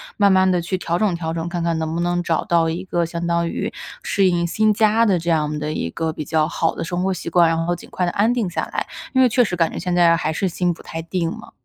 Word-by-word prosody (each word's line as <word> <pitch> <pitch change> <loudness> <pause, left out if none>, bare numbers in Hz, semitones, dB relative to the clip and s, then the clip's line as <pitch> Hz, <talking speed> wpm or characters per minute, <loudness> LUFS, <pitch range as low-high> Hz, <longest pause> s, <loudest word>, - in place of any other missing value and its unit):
慢 200 -2 +4
慢 190 0 +4
地 180 -1 +2
去 185 +3 -2
调 170 0 -1
整 210 -2 +1
调 165 -1 -3
整， 165 +1 -3
看 175 -1 -3
看 165 -1 0
能 160 0 -2
不 170 - -2
能 175 0 0
找 165 -2 0
到 170 -4 +2
一 175 +4 -4
个 175 -2 0
相 170 +1 -4
当 170 0 +1
于 - - -3 0.3
适 195 - +1
应 170 -1 +1
新 215 +4 +2
家 220 +2 +3
的 190 -5 +2
这 170 +1 -3
样 150 -2 0
的 150 +1 -3
一 85 - -2
个 160 - -3
比 155 - -5
较 155 +1 +1
好 165 -1 0
的 - - -4
生 175 +1 -2
活 190 - +1
习 180 - -5
惯， 170 -1 +4
然 165 0 0
后 175 +1 0
尽 175 - -13
快 180 - -1
地 175 - -1
安 220 +4 +2
定 225 -7 -1
下 - - -2
来， - - -2 0.3
因 260 - +4
为 255 - +6
确 245 +1 +3
实 180 -5 -2
感 165 -1 +2
觉 - - -5
现 180 - -2
在 170 -1 +5
还 160 -2 -1
是 190 +4 -1
心 175 0 0
不 - - -14
太 165 - -6
定 170 0 -2
嘛。 - - -11
170 Hz, 320 characters per minute, -21 LUFS, 165-185 Hz, 0.3 s, 为